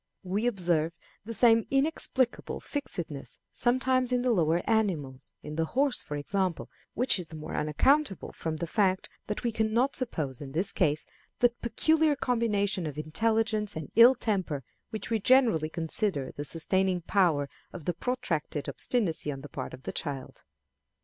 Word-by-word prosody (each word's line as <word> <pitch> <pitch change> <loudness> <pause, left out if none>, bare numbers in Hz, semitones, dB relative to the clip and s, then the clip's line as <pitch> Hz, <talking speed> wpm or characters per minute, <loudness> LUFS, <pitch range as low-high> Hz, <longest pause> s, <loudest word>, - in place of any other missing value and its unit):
We 200 +5 -1
observe 170 -7 +1 0.3
the 230 - -5
same 230 -2 +5
inexplicable 270 -3 0
fixedness 175 - -5
sometimes 255 +1 +1
in 250 0 +1
the 250 - +2
lower 170 -4 +1
animals 170 - -1
in 150 +1 -7
the 165 - +1
horse, 275 -1 +2
for 145 - -5
example; 185 +3 -2 0.2
which 245 -5 +2
is 175 - -5
the 160 - -10
more 155 0 -7
unaccountable 195 - +1
from 160 -1 -4
the 170 - -2
fact 190 +1 +1 0.2
that 210 - -3
we 240 - +1
can 220 0 -1
not 260 +4 +2
suppose, 155 - -3
in 135 0 -8
his 180 +5 +3
case, 150 -4 +1 0.3
that 240 -1 +2
peculiar 310 +6 +2
combination 210 - 0
of 150 -1 -6
intelligence 215 +6 0
and 155 -3 -6
ill 235 +4 +8
temper 185 - -2 0.3
which 220 +1 -5
we 225 - +2
generally 225 - +4
consider 160 -3 0
the 145 - -6
sustaining 185 +4 +1
power 170 -6 +2 0.2
of 170 -5 -9
the 175 - 0
protracted 170 - -2
obstinacy 185 -11 -1
on 135 -1 -7
the 145 - -10
part - - -6
of 130 - -11
the - - -4
child. 140 -4 -5
195 Hz, 165 wpm, -29 LUFS, 155-235 Hz, 0.3 s, ill